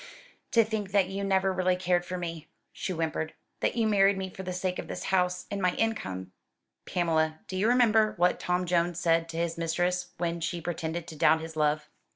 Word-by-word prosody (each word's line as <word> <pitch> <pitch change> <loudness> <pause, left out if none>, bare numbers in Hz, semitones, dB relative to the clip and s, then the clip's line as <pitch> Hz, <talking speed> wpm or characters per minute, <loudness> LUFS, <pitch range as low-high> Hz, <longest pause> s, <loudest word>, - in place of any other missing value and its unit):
"To 230 -2 +6
think 210 -3 -3
that 195 -2 +3
you 195 +1 -3
never 190 -1 +2
really 185 0 +2
cared 180 -1 +1
for 180 - -3
me!" 165 -3 -5 0.3
she - - -4
whimpered; 160 -2 -2 0.2
"that - - 0
you 230 -2 +2
married 200 -2 +4
me 190 -1 -4
for 190 - -8
the 185 -1 -4
sake 180 0 -2
of - - -5
this - - -5
house, 180 -1 +1
and 200 -1 -2
my 180 -1 +2
income!" 95 - -2 0.6
"Pamela, 160 -3 +1
do 185 - -5
you 195 +4 +2
remember 220 -3 +4
what 180 +1 +3
Tom 180 0 0
Jones 175 -1 +1
said 165 -1 +2
to 165 - -6
his 170 0 -1
mistress 175 +2 0
when 170 0 -2
she 170 +1 -2
pretended 165 0 -3
to 165 - -9
doubt 160 +1 +4
his 160 0 -7
love?" 150 0 +1
180 Hz, 205 wpm, -29 LUFS, 165-190 Hz, 0.6 s, To